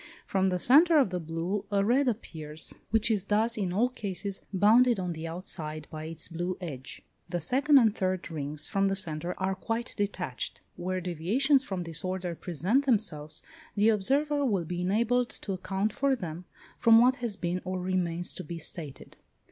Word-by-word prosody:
From 190 -1 +1
the 180 - 0
centre 310 - +6
of 265 -10 +4
the 180 - -1
blue 170 +5 -3
a 200 -1 +2
red 260 +5 +3
appears, 160 -9 -4 0.2
which 225 +1 +3
is 200 -3 0
thus, 220 +3 +2
in 195 -4 -1
all 215 +7 +3
cases, 200 -4 -4
bounded 220 +4 +5
on 180 -2 -2
the 160 0 -6
outside 155 -3 -6
by 155 0 -6
its 165 0 -4
blue 175 +2 -3
edge. 135 -8 -7 0.3
The 175 0 -1
second 275 - +4
and 225 -5 +4
third 185 -2 -2
rings 150 -1 -3
from 195 -1 +1
the 195 - +1
centre 170 -1 -2
are 190 0 0
quite 225 +5 -3
detached. 190 - -3
Where 185 +1 -3
deviations 210 - +2
from 190 -7 -4
this 165 -1 -2
order 185 -1 -2
present 185 - 0
themselves, 160 - 0 0.3
the 210 +2 +4
observer 280 +8 +2
will 200 -10 +1
be 175 +2 -3
enabled 235 +6 +1
to 195 - -5
account 195 +3 -2
for 275 -1 +2
them, 175 -5 -6 0.3
from 225 -1 +7
what 255 +2 +4
has 235 -4 -3
been 180 -1 -2
or 185 0 -3
remains 180 -1 0
to 185 - -7
be 170 -1 -6
stated. 155 -3 -6
190 Hz, 180 wpm, -29 LUFS, 170-225 Hz, 0.3 s, from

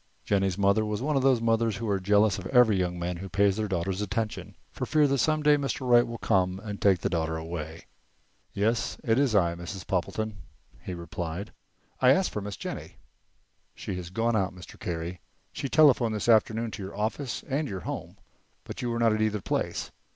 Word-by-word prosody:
Jennie's 95 -2 +1
mother 100 +2 +3
was 105 -1 -2
one 145 +4 -1
of 135 - +3
those 130 -3 +3
mothers 115 -1 +2
who 115 - -4
are 100 -2 +1
jealous 100 +1 +3
of 95 - -6
every 125 -3 +5
young 90 -1 -1
man 85 0 -3
who 95 +2 -7
pays 100 0 +3
their 110 0 -1
daughters 95 +1 -2
attention, 110 +2 -3 0.2
for - - -4
fear 155 0 +4
that 140 -1 +1
some 155 +3 +2
day 150 0 +5
Mr. 135 -2 -3
Wright 120 -1 +5
will 115 0 -5
come 90 -3 +1
along 110 - -11
and 100 - -7
take 95 -3 +4
the - - 0
daughter 80 -2 -1
away. 80 0 -6 0.7
"Yes, 115 +4 0
it 115 +2 +2
is 135 -6 +2
I, 85 -4 +3
Mrs. 90 +1 -7
Poppleton," 105 +3 -2 0.4
he 90 - -6
replied. 85 +3 -5 0.5
"I 130 0 +6
asked 190 +5 +1
for 105 - -3
Miss 100 -1 -6
Jennie." - - -6 0.8
"She - - -5
has 90 -1 -6
gone 115 +4 0
out, 95 -3 0
Mr. 90 - -12
Carey. 85 0 -4 0.3
She 140 - -4
telephoned 130 -8 +5
this 105 - -3
afternoon 115 0 +3
to 105 - -7
your 95 +1 -7
office 115 +4 -2
and 145 +2 -1
your 95 -6 -5
home, - - -6 0.5
but - - -7
you 120 - -2
were 115 - -1
not 115 -2 +3
at 110 - -1
either 105 -1 +1
place. - - -2
105 Hz, 210 wpm, -27 LUFS, 90-115 Hz, 0.8 s, I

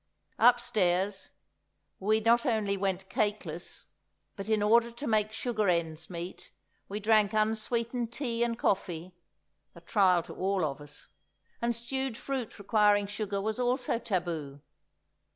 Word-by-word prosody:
Upstairs 205 -5 +3 0.7
we 215 +3 +2
not 235 +2 +4
only 215 -4 +1
went 190 -1 -2
cakeless, 210 0 -3 0.5
but 195 +2 -6
in 215 -1 +2
order 230 +2 +4
to 235 +5 -8
make 215 -3 +1
sugar 220 -3 -1
ends 165 -2 -1
meet, 175 0 -7 0.4
we 205 +2 -3
drank 215 -1 +3
unsweetened 230 +2 0
tea 235 -2 -1
and 235 -1 -1
coffee, 180 -5 -1 0.6
a 170 - -12
trial 180 -1 +3
to - - -9
all 190 -2 0
of 140 -1 -4
us! 145 0 -9 0.6
And 235 0 +1
stewed 255 +1 -2
fruit 265 -5 -4
requiring 205 0 +3
sugar 205 0 -3
was 220 +4 -2
also 245 -1 +1
taboo. 165 -9 -3
210 Hz, 135 wpm, -30 LUFS, 190-230 Hz, 0.7 s, not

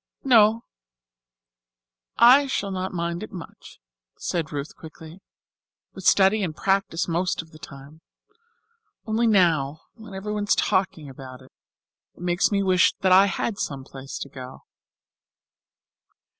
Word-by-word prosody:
"Oh, 225 -2 +4 1.5
I 260 +4 +6
shall 200 -6 -2
not 185 0 -3
mind 170 0 -3
it 215 - -8
much," 180 -5 -12 0.4
said 165 -3 -3
Ruth 145 0 -6
quickly, 160 +2 -13 0.7
"with 190 - -10
study 200 +2 +4
and 165 -5 -3
practice 195 -3 0
most 175 0 -1
of 160 - -21
the 155 - -15
time. 140 +2 -13 1.0
Only 225 +2 0
now, 160 -8 +2
when 220 -3 -12
everyone 210 +1 -4
is - - +3
talking 185 -5 -1
about 130 -1 -11
it, 130 - -20 0.6
it - - -17
makes 175 +3 +1
me 200 -1 +1
wish 185 -2 +3
that 190 -2 +2
I 190 +2 +7
had 200 +1 -3
some 135 -2 -4
place 135 0 -9
to 140 - -7
go." 130 -1 -11
185 Hz, 135 wpm, -24 LUFS, 155-200 Hz, 1.5 s, I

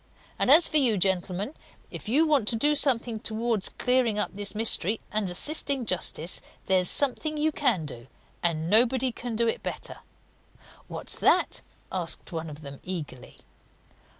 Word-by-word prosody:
And - - +1
as 320 +5 +7
for 310 - +1
you, 245 -7 +4
gentlemen, 190 - -1 0.4
if - - -7
you 295 +8 +4
want 290 -9 +1
to 230 - +3
do 295 +7 +3
something 240 -6 +1
towards 220 -2 -1
clearing 250 -4 0
up 210 - +1
this 205 +1 -4
mystery, 220 -1 +2
and 210 -3 -1
assisting 275 - +2
justice, 180 -3 -1 0.2
there's 185 -2 +3
something 300 +2 +1
you 310 +1 +1
can 245 - 0
do 120 -4 -9 0.3
and 165 -2 -1
nobody 245 +5 +3
can 240 0 -6
do 230 +1 +1
it - - -1
better." - - -5 0.9
"What's - - -3
that?" - - +2 0.3
asked 180 -1 -4
one 165 -1 -5
of 150 +1 -11
them 140 -1 -8
eagerly. 160 -9 -7
220 Hz, 155 wpm, -26 LUFS, 180-255 Hz, 0.9 s, as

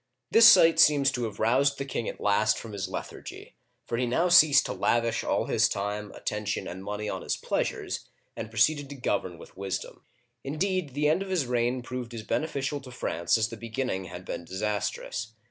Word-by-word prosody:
This 225 0 +8
sight 165 -8 +7
seems 145 -3 +5
to 120 -1 -2
have 105 -2 -7
roused 135 +5 +2
the 140 - -4
king 120 -4 -3
at - - -8
last 105 +1 +2
from 115 - -8
his 100 -3 -4
lethargy, - - -8 0.3
for 115 - -3
he 125 - 0
now 165 +9 +1
ceased 155 -4 +7
to - - -3
lavish 115 -1 0
all - - 0
his - - +2
time, 105 +1 -3
attention, 105 -2 -3
and 95 +2 -7
money 105 +1 -4
on - - -4
his - - -2
pleasures, - - -3 0.3
and 115 - -6
proceeded 140 +6 +2
to 140 - -7
govern 95 -8 -2
with - - -14
wisdom. 95 -1 -5 0.4
In 140 +3 -5
deed, 185 -6 -1
the 150 +1 +2
end 155 +5 +2
of 195 - -5
his 180 -7 0
reign 125 +1 0
proved 125 -1 -6
as 110 - -6
beneficial 145 +1 -2
to 130 - -11
France 85 -6 0
as 110 0 0
the 115 - -8
beginning 115 -4 -3
had 90 +1 -9
been - - -5
disastrous. 105 +3 -3
120 Hz, 200 wpm, -27 LUFS, 105-140 Hz, 0.4 s, This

